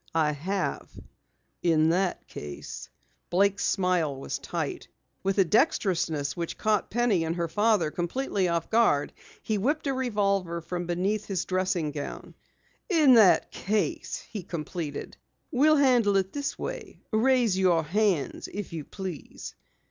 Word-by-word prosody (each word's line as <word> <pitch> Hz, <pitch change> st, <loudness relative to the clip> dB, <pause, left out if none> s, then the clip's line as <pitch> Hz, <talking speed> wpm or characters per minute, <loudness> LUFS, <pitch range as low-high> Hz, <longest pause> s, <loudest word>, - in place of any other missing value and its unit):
"I 155 Hz, -2 st, +3 dB
have." 185 Hz, +7 st, -3 dB, 0.7 s
"In 160 Hz, -2 st, +3 dB
that 180 Hz, +2 st, 0 dB
case 75 Hz, -1 st, -8 dB, 0.2 s
" -, -, -43 dB
Blake's 200 Hz, +2 st, +2 dB
smile 180 Hz, -7 st, +1 dB
was -, -, -4 dB
tight. -, -, -4 dB, 0.3 s
With 195 Hz, +1 st, -1 dB
a 195 Hz, -, +5 dB
dextrousness 170 Hz, -, +1 dB
which 170 Hz, -2 st, -4 dB
caught 215 Hz, -2 st, +1 dB
Penny 230 Hz, -7 st, +2 dB
and 165 Hz, +1 st, -2 dB
her 170 Hz, -1 st, -1 dB
father 205 Hz, -2 st, +2 dB
completely 190 Hz, +2 st, -1 dB
off 170 Hz, -1 st, -2 dB
guard, 220 Hz, -11 st, +3 dB, 0.3 s
he 215 Hz, -2 st, -1 dB
whipped 295 Hz, +10 st, 0 dB
a 275 Hz, -, 0 dB
revolver 200 Hz, -9 st, 0 dB
from 175 Hz, +1 st, -5 dB
beneath 195 Hz, +5 st, -1 dB
his 190 Hz, -3 st, -2 dB
dressing 185 Hz, -4 st, 0 dB
robe. 145 Hz, -, -6 dB, 0.6 s
"In 310 Hz, -8 st, +6 dB
that 215 Hz, -6 st, +5 dB
case," 210 Hz, +2 st, -2 dB
he 210 Hz, -, -4 dB
completed, 160 Hz, -3 st, -5 dB, 0.3 s
"we'll 305 Hz, +3 st, +4 dB
handle 245 Hz, -8 st, +4 dB
it 190 Hz, 0 st, -1 dB
this 285 Hz, -1 st, -3 dB
way. -, -, -7 dB
Raise 235 Hz, -2 st, +3 dB
your 180 Hz, -4 st, +3 dB
hands, 185 Hz, -2 st, 0 dB
if 200 Hz, -3 st, -6 dB
you 160 Hz, -2 st, -4 dB
please." 185 Hz, -2 st, -7 dB
190 Hz, 140 wpm, -27 LUFS, 170-215 Hz, 0.7 s, In